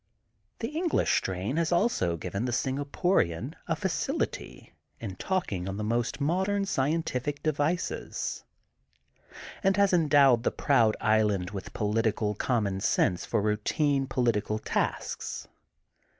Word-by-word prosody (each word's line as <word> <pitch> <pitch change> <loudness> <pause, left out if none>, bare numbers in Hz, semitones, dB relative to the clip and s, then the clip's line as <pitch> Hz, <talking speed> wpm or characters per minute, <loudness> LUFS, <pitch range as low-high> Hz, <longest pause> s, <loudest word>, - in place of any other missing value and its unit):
The 230 - -1
English 325 +3 +1
strain 95 - -1
has 170 0 +1
also 170 - +1
given 100 +7 -3
the 125 - -1
Singaporian 135 - 0
a - - +1
facility - - -3 0.3
in 100 -5 -6
taking 100 - -2
on 95 - -4
the 105 - -3
most 120 +5 -1
modern 190 +7 +1
scientific 145 -3 -1
devices, 155 +3 -1 1.2
and 195 -1 +2
has 200 -2 +4
endowed 145 -7 +5
the - - +1
proud 115 -7 +2
island 105 -4 +2
with 95 -2 -7
politi 110 +1 0
cal 105 -1 0
common 105 -4 0
sense 90 -3 +1
for 105 - 0
routine 135 +7 +1
political 115 -4 0
tasks. 110 - -3
125 Hz, 120 wpm, -28 LUFS, 105-160 Hz, 1.2 s, endowed